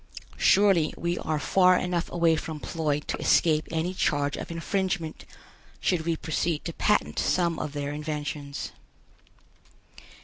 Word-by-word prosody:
Surely 195 Hz, -6 st, +4 dB
we 170 Hz, 0 st, -1 dB
are 155 Hz, 0 st, -1 dB
far 185 Hz, +4 st, +4 dB
enough 180 Hz, -1 st, -2 dB
away 170 Hz, -2 st, +3 dB
from 155 Hz, -1 st, -5 dB
Ploid 150 Hz, -2 st, -2 dB
to -, -, -3 dB
escape 155 Hz, -2 st, +3 dB
any 165 Hz, +3 st, -1 dB
charge 145 Hz, -6 st, 0 dB
of -, -, -6 dB
infringement, 170 Hz, -1 st, -2 dB, 0.5 s
should 170 Hz, -3 st, 0 dB
we 165 Hz, -, +2 dB
proceed 160 Hz, 0 st, -2 dB
to 170 Hz, -, -3 dB
patent 210 Hz, +5 st, +1 dB
some 170 Hz, -2 st, +1 dB
of 145 Hz, -, -4 dB
their 145 Hz, -1 st, -3 dB
inventions. 150 Hz, -1 st, -4 dB
165 Hz, 135 wpm, -27 LUFS, 150-175 Hz, 0.5 s, Surely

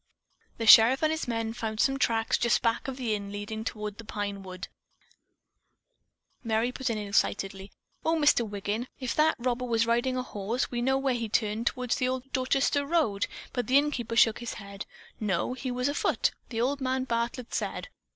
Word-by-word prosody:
The 230 Hz, -, -2 dB
sheriff 230 Hz, +6 st, +8 dB
and 310 Hz, -, +3 dB
his 315 Hz, -3 st, -2 dB
men 225 Hz, -1 st, -2 dB
found 220 Hz, -2 st, -4 dB
some 270 Hz, +2 st, +2 dB
tracks 225 Hz, -3 st, +2 dB
just 235 Hz, -1 st, +2 dB
back 230 Hz, +2 st, 0 dB
of 265 Hz, -1 st, -4 dB
the 240 Hz, -5 st, -1 dB
inn 200 Hz, -1 st, -4 dB
leading 210 Hz, +2 st, -5 dB
toward 210 Hz, -1 st, -5 dB
the -, -, -7 dB
pine 205 Hz, -2 st, -4 dB
wood." 185 Hz, -1 st, -8 dB, 1.8 s
Merry 225 Hz, +1 st, +1 dB
put 260 Hz, 0 st, -3 dB
in 225 Hz, -, -1 dB
excitedly: 195 Hz, -1 st, -1 dB, 0.3 s
"Oh, 325 Hz, -, +2 dB
Mr. 295 Hz, -5 st, +4 dB
Wiggin, 210 Hz, +3 st, -3 dB
if 255 Hz, -2 st, -2 dB
that 310 Hz, +1 st, +3 dB
robber 250 Hz, +1 st, -1 dB
was 230 Hz, -2 st, +2 dB
riding 240 Hz, +3 st, +1 dB
a 255 Hz, -, -1 dB
horse, 225 Hz, +2 st, -3 dB
we 240 Hz, -1 st, -2 dB
know 265 Hz, +2 st, +2 dB
where 270 Hz, -1 st, +1 dB
he 230 Hz, -2 st, -3 dB
turned 215 Hz, +1 st, 0 dB
toward 250 Hz, -2 st, -2 dB
the 255 Hz, -, +2 dB
old 260 Hz, +1 st, -4 dB
Dorchester 270 Hz, +2 st, +1 dB
road." 280 Hz, -10 st, +1 dB, 0.3 s
But 245 Hz, -2 st, -2 dB
the 260 Hz, +2 st, +5 dB
innkeeper 270 Hz, -6 st, 0 dB
shook 225 Hz, -2 st, +5 dB
his 240 Hz, -1 st, -5 dB
head. 200 Hz, -1 st, -8 dB, 0.3 s
"No, 205 Hz, +2 st, 0 dB
he 260 Hz, 0 st, -5 dB
was 250 Hz, +1 st, -1 dB
afoot, 285 Hz, -, +1 dB, 0.2 s
old 255 Hz, +5 st, 0 dB
man 260 Hz, 0 st, 0 dB
Bartlett 235 Hz, 0 st, -3 dB
said. -, -, -3 dB
235 Hz, 185 wpm, -28 LUFS, 215-260 Hz, 1.8 s, sheriff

